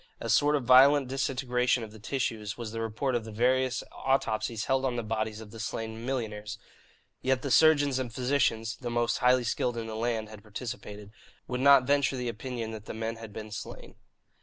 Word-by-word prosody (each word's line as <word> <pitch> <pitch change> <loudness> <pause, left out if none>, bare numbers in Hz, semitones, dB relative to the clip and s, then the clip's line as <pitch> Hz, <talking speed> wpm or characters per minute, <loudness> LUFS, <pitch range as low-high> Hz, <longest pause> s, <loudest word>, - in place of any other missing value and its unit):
A - - -5
sort 145 +1 +4
of 140 - -1
violent 130 +2 +6
disintegration 125 -2 0
of 110 - -8
the 110 - -13
tissues 110 -3 -3
was 115 -3 -5
the 115 0 -4
report 115 +4 -2
of 120 -2 0
the 110 - -8
various 125 +3 +1
autopsies 120 -4 -1
held 135 0 +1
on 130 -2 0
the 120 - -2
bodies 110 0 -3
of 105 -2 -11
the 115 - -10
slain 110 0 -4
millionaires; 105 -5 -3 0.6
yet 130 0 +1
the 140 - -2
surgeons 145 -2 +5
and 125 -3 -3
physicians 120 -3 0
(the 120 - -3
most 120 0 0
highly 125 0 +4
skilled 120 +1 -1
in 115 - -3
the 110 -1 -6
land 115 -1 -1
had 110 -1 -11
participated) 105 -2 -7 0.4
would 125 0 -3
not 140 -1 +7
venture 140 -1 +2
the 125 -1 -2
opinion 115 0 -5
that 110 -1 -8
the - - -7
men 115 +1 -3
had 115 -2 -9
been 110 +1 -8
slain. 105 - -8
120 Hz, 200 wpm, -29 LUFS, 110-130 Hz, 0.6 s, not